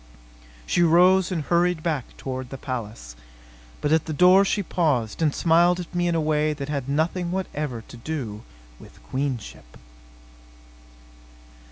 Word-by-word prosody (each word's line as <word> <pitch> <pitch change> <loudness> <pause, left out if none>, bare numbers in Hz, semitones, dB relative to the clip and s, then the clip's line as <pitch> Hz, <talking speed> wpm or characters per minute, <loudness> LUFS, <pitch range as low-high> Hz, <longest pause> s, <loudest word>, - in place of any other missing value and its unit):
She 175 - +1
rose 180 +3 +4
and 165 -4 -2
hurried 175 +1 +1
back 155 -7 -3
toward 130 -1 -5
the 135 - -7
palace. 110 - -6 0.7
But 145 - 0
at 160 -1 +3
the 155 - -4
door 180 +5 +6
she 200 +1 0
paused 150 - -1
and 155 -2 +3
smiled 175 +3 +3
at 175 0 -8
me 175 0 0
in 170 - 0
a - - +2
way 155 0 +1
that 140 -1 -6
had 140 -3 -3
nothing 170 +5 0
whatever 150 -10 -4
to - - -12
do 120 -6 -5 0.4
with - - -16
queenship. 125 - -5
155 Hz, 150 wpm, -24 LUFS, 130-175 Hz, 0.7 s, door